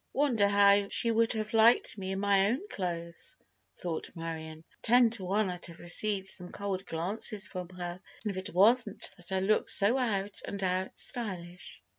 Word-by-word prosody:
"Wonder 250 -8 +2
how 200 0 +4
she 235 - +2
would 230 +1 +2
have 215 -1 -4
liked 225 +2 +4
me 190 -3 -6
in 190 0 -3
my 200 0 +2
own 270 - -3
clothes?" 170 -2 -5 0.4
thought 170 -3 -5
Marion. 160 -1 -7 0.2
"Ten 240 0 +4
to 220 -4 -2
one 200 +3 0
I'd 180 0 -6
have 170 -1 -13
received 195 +2 +3
some 180 -2 -1
cold 195 -2 -5
glances 195 +5 -1
from 180 -1 -7
her 180 0 -7 0.2
if 205 -2 -3
it 185 0 -6
wasn't 215 +3 +2
that 175 0 -8
I 190 - 0
look 200 +3 0
so 220 +7 +5
out 205 -5 -1
and 200 -1 -5
out 185 0 -2
stylish." 185 -8 -1
195 Hz, 175 wpm, -29 LUFS, 180-215 Hz, 0.4 s, so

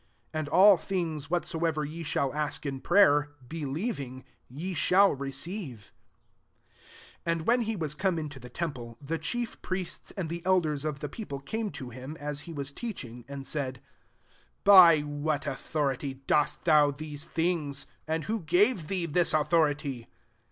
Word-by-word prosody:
22 155 - -2
And 150 -2 -3
all 195 +4 +7
things 160 -6 -3
what 175 0 0
soever 160 -2 -1
ye 160 +3 -6
shall 140 -3 -1
ask 150 0 -3
in 135 -2 -3
prayer, 150 -6 +4
believing, 145 - -4 0.3
ye 165 +9 -5
shall 195 +3 +4
receive," 140 - -5 1.3
23 170 - +2
And 165 -1 -2
when 245 +1 +4
he 225 -1 -1
was 155 -6 -2
come 185 +2 0
into 150 -3 -5
the 125 0 -11
temple, 125 -9 -5
the 160 +3 -3
chief 240 -1 -3
priests 185 -1 -4
and 185 -4 -2
the 170 +2 -5
elders 160 -6 +1
of 145 -3 -3
the 150 - -2
people 145 - -6
same 220 -1 -2
to 130 -3 -7
him, 130 +6 -8
as 145 0 -3
he - - -5
was 140 -3 -4
teach 220 - -5
ing, 120 0 -11
and 140 -1 -7
said, 130 -4 -2 0.5
" - - -35
By 180 -6 +9
what 145 0 -2
autho 140 0 -1
rity 135 0 -6
dost 150 -1 +1
thou 150 -3 +6
these 145 +1 -6
things? 155 -5 -1 0.2
and 160 0 -1
who 220 +5 -2
gave 180 +2 +2
thee 185 -1 -1
this 170 +2 +2
autho 155 0 +4
rity?" 140 -5 -6
155 Hz, 175 wpm, -29 LUFS, 140-175 Hz, 1.3 s, By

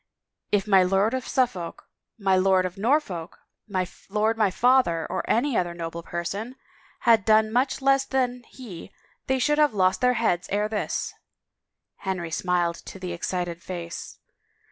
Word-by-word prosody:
If 205 -1 +2
my 195 -3 +5
Lord 195 +5 +2
of 260 -1 -3
Suffolk, 200 -10 -1 0.3
my 195 -3 +2
Lord 185 0 +3
of 180 0 -4
Norfolk, 200 - -1 0.3
my 185 -3 -1 0.2
lord 215 +3 +1
my 215 -3 +3
father, 210 -7 +3
or - - -1
any 250 +3 +2
other 175 -3 0
noble 170 0 -5
person 195 +9 -4 0.5
had 225 -3 +5
done 215 +1 +4
much 260 +2 +1
less 275 0 +4
than 250 -2 -1
he 200 -8 -10 0.4
they 265 - +2
should 295 +4 +2
have 295 -7 +3
lost 185 -1 +2
their 250 0 +3
heads 200 -6 0
ere 205 +1 +1
this! 215 -1 -2 0.4
" - - -60 0.3
Henry 185 -4 -3
smiled 175 -1 0
into - - -10
the 180 -2 -5
excited 175 -1 -3
face. 170 -2 -7
195 Hz, 160 wpm, -25 LUFS, 180-245 Hz, 0.5 s, my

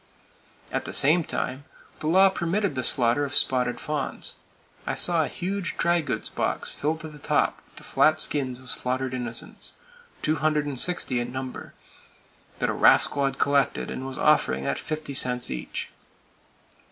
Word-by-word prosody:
At - - -2
the - - -5
same 160 +5 +4
time, 130 -1 -3 0.3
the 155 - -3
law 190 +4 +6
permitted 190 +1 0
the 130 - -1
slaughter 120 +3 +2
of 140 0 -3
spotted 125 -2 +2
fawns. 150 -3 -3 0.5
I - - 0
saw 170 -2 +2
a - - -1
huge 190 +1 -3
drygoods 165 -9 +1
box - - -2
filled 155 +2 -2
to 160 - -6
the 150 -1 -11
top - - +1
with - - -28
the - - -11
flat 155 0 +3
skins 130 -5 -1
of 130 0 -8
slaughtered 130 +1 -1
innocents, 120 -2 -4 0.5
260 150 -2 0
in 120 0 -3
number, 130 0 -6 0.8
that - - 0
a - - -2
rascal 140 - +5
had 135 0 -1
collected 140 0 +1
and 130 - -4
was 135 - -7
offering 70 - +3
at 70 0 -1
fifty 155 -2 -5
cents 125 -2 +1
each. 65 - -5
140 Hz, 155 wpm, -26 LUFS, 130-155 Hz, 0.8 s, law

